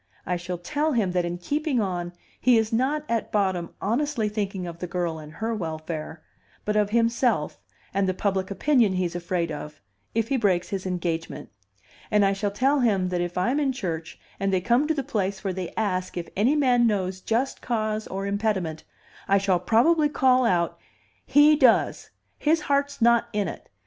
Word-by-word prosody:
"I 180 Hz, -, -1 dB
shall 175 Hz, +1 st, -4 dB
tell 300 Hz, -, -1 dB
him 210 Hz, -7 st, +1 dB
that 180 Hz, -1 st, 0 dB
in 175 Hz, 0 st, -3 dB
keeping 285 Hz, -, -1 dB
on 175 Hz, -4 st, -2 dB, 0.3 s
he 250 Hz, -1 st, +4 dB
is 220 Hz, 0 st, 0 dB
not 280 Hz, +6 st, +1 dB
at 230 Hz, -1 st, -1 dB
bottom 190 Hz, -4 st, 0 dB
honestly 240 Hz, +1 st, 0 dB
thinking 200 Hz, -3 st, -3 dB
of 170 Hz, -1 st, -7 dB
the 180 Hz, -, -4 dB
girl 175 Hz, -3 st, -2 dB
and 155 Hz, 0 st, -11 dB
her 225 Hz, +7 st, -3 dB
welfare, 160 Hz, -4 st, -5 dB, 0.4 s
but 210 Hz, -, 0 dB
of 210 Hz, -1 st, +2 dB
himself 230 Hz, -, +1 dB, 0.3 s
and 195 Hz, -1 st, +1 dB
the 185 Hz, -, -1 dB
public 190 Hz, -1 st, -1 dB
opinion 230 Hz, -1 st, +2 dB
he's 180 Hz, -2 st, -1 dB
afraid 175 Hz, -1 st, -2 dB
of, 150 Hz, 0 st, -7 dB, 0.4 s
if 225 Hz, -1 st, 0 dB
he 275 Hz, -, +2 dB
breaks 190 Hz, -6 st, +1 dB
his 190 Hz, -1 st, -3 dB
engagement. 170 Hz, -2 st, -3 dB, 0.6 s
And 210 Hz, -1 st, +4 dB
I 195 Hz, -, +3 dB
shall 200 Hz, +1 st, -1 dB
tell 265 Hz, +8 st, +2 dB
him 200 Hz, -7 st, +2 dB
that 180 Hz, -1 st, -1 dB
if 175 Hz, 0 st, -3 dB
I'm 245 Hz, +11 st, +1 dB
in 275 Hz, -3 st, +1 dB
church 170 Hz, -8 st, -5 dB, 0.2 s
and 195 Hz, 0 st, 0 dB
they 190 Hz, -, +2 dB
come 240 Hz, +10 st, +2 dB
to 320 Hz, -, +1 dB
the 275 Hz, -, -1 dB
place 200 Hz, -7 st, -2 dB
where 195 Hz, -2 st, -1 dB
they 180 Hz, -2 st, -5 dB
ask 185 Hz, -4 st, -1 dB
if 170 Hz, -, -4 dB
any 235 Hz, +9 st, +3 dB
man 250 Hz, -5 st, +4 dB
knows 190 Hz, -3 st, -1 dB
just 245 Hz, +7 st, -1 dB
cause 215 Hz, -2 st, -2 dB
or 195 Hz, +1 st, -4 dB
impediment, 200 Hz, -6 st, -1 dB, 0.4 s
I 200 Hz, -, +4 dB
shall 195 Hz, -2 st, +2 dB
probably 295 Hz, -, +3 dB
call 255 Hz, -3 st, +3 dB
out, 175 Hz, -4 st, 0 dB, 0.5 s
'He 290 Hz, +3 st, +6 dB
does! 260 Hz, -6 st, +3 dB, 0.3 s
His 310 Hz, +1 st, +2 dB
heart's 280 Hz, -3 st, 0 dB
not 235 Hz, 0 st, +4 dB
in 205 Hz, -2 st, 0 dB
it. -, -, -8 dB
200 Hz, 190 wpm, -25 LUFS, 180-245 Hz, 0.6 s, He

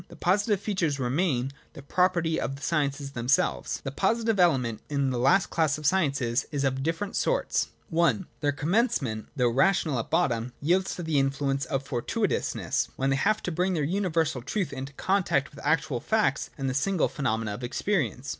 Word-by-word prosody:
The -, -, -13 dB
positive 200 Hz, +3 st, +1 dB
features 180 Hz, -9 st, -1 dB
remain 135 Hz, 0 st, 0 dB, 0.2 s
the 140 Hz, -, -11 dB
property 170 Hz, 0 st, +1 dB
of 135 Hz, -, -2 dB
the 140 Hz, -, -12 dB
sciences 145 Hz, -3 st, -1 dB
themselves. 125 Hz, +1 st, 0 dB
The 135 Hz, -, -4 dB
positive 220 Hz, +6 st, +1 dB
element 130 Hz, -11 st, +2 dB
in 140 Hz, -2 st, 0 dB
the 125 Hz, -, -1 dB
last 135 Hz, +10 st, +3 dB
class 155 Hz, -3 st, +1 dB
of 150 Hz, -, -8 dB
sciences 140 Hz, -8 st, +1 dB
is 145 Hz, -2 st, -1 dB
of 135 Hz, -1 st, 0 dB
different 165 Hz, +7 st, -2 dB
sorts. -, -, +1 dB, 0.3 s
(I) 170 Hz, +3 st, +3 dB, 0.2 s
Their 145 Hz, -2 st, +1 dB
commencement, 150 Hz, -, 0 dB
though 125 Hz, -3 st, +2 dB
ra 140 Hz, +11 st, +5 dB
tional 155 Hz, -9 st, 0 dB
at 115 Hz, -, -5 dB
bottom, 120 Hz, +1 st, 0 dB
yields 180 Hz, +5 st, +1 dB
to 175 Hz, -, -5 dB
the 160 Hz, -3 st, +1 dB
influence 135 Hz, 0 st, 0 dB
of 135 Hz, +1 st, -2 dB
foi 130 Hz, -3 st, -3 dB
tuitousness, -, -, -1 dB
when 135 Hz, +1 st, 0 dB
they -, -, +3 dB
have 215 Hz, +10 st, +1 dB
to 180 Hz, -, -2 dB
bring 180 Hz, +3 st, 0 dB
their 155 Hz, -, 0 dB
universal 165 Hz, -5 st, 0 dB
truth 180 Hz, -, -2 dB
into 135 Hz, +1 st, -6 dB
con 195 Hz, +7 st, +1 dB
tact 140 Hz, -4 st, 0 dB
with 140 Hz, -, -11 dB
actual 140 Hz, -5 st, +1 dB
facts 215 Hz, -, +1 dB
and 135 Hz, -2 st, -2 dB
the 130 Hz, -, 0 dB
single 165 Hz, +6 st, +1 dB
phenomena 110 Hz, -6 st, -2 dB
of 120 Hz, -, -7 dB
ex 120 Hz, -, -3 dB
perience. 170 Hz, -10 st, 0 dB
145 Hz, 190 wpm, -27 LUFS, 135-180 Hz, 0.3 s, ra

